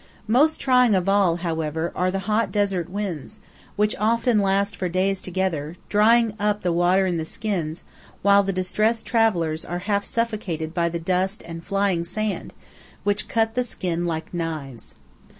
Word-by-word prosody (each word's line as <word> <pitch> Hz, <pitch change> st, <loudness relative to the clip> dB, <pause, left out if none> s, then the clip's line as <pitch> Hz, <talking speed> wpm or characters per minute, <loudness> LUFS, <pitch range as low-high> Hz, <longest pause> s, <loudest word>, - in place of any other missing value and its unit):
Most 290 Hz, +8 st, +4 dB
trying 250 Hz, -5 st, +4 dB
of 185 Hz, 0 st, 0 dB
all, 195 Hz, -4 st, +3 dB
however, 160 Hz, -1 st, -2 dB
are 180 Hz, +1 st, +1 dB
the 190 Hz, -, -1 dB
hot 215 Hz, +2 st, +1 dB
desert 195 Hz, -5 st, 0 dB
winds, 200 Hz, 0 st, -5 dB, 0.4 s
which 210 Hz, +1 st, +1 dB
often 230 Hz, +1 st, +2 dB
last 200 Hz, 0 st, +1 dB
for 180 Hz, -, -2 dB
days 190 Hz, +2 st, 0 dB
together, 175 Hz, -5 st, -2 dB
drying 225 Hz, +1 st, +4 dB
up 210 Hz, 0 st, 0 dB
the 175 Hz, -1 st, +1 dB
water 180 Hz, +3 st, +3 dB
in 180 Hz, -2 st, 0 dB
the 160 Hz, -, -2 dB
skins, 170 Hz, -3 st, -3 dB, 0.4 s
while 200 Hz, 0 st, +6 dB
the 195 Hz, 0 st, -1 dB
distressed 215 Hz, +5 st, 0 dB
travellers 175 Hz, -9 st, +1 dB
are 175 Hz, -, -4 dB
half 200 Hz, -1 st, +1 dB
suffocated 205 Hz, -10 st, -2 dB
by 170 Hz, -1 st, +1 dB
the 170 Hz, -, -3 dB
dust 185 Hz, +4 st, -1 dB
and 165 Hz, 0 st, -8 dB
flying 195 Hz, -3 st, 0 dB
sand 205 Hz, +4 st, -3 dB, 0.5 s
which 205 Hz, 0 st, 0 dB
cut 225 Hz, -1 st, +1 dB
the 250 Hz, -, +1 dB
skin 175 Hz, -7 st, -2 dB
like 160 Hz, 0 st, -4 dB
knives. 155 Hz, -8 st, -5 dB
195 Hz, 165 wpm, -23 LUFS, 170-210 Hz, 0.5 s, while